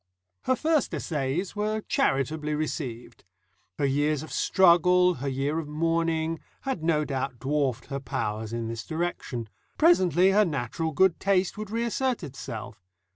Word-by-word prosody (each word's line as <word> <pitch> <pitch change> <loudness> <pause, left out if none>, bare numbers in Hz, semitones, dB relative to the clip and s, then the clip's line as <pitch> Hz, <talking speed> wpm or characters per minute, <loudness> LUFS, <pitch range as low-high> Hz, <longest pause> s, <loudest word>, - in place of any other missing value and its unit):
Her 260 - +3
first 310 0 +1
essays 155 +5 -2
were 215 +1 -1
charitably 150 -1 0
received. 135 -6 -4 0.5
Her 145 - +1
years 145 +2 +1
of 155 - -10
struggle, 180 0 +4
her 140 - -2
year 140 +4 -1
of 160 - -5
mourning, 165 +1 0 0.2
had 265 - -3
no 155 -2 +2
doubt 135 -3 -3
dwarfed 135 -2 -1
her 140 - -4
powers 110 -4 -3
in 115 -1 -3
this 115 0 -5
direction; 160 -8 -3 0.3
presently 185 - +5
her 210 +2 +5
natural 155 - -2
good 190 +3 +3
taste 190 -2 +1
would 215 -1 -6
reassert 235 +1 -1
itself. 125 - -7
155 Hz, 140 wpm, -27 LUFS, 135-180 Hz, 0.5 s, presently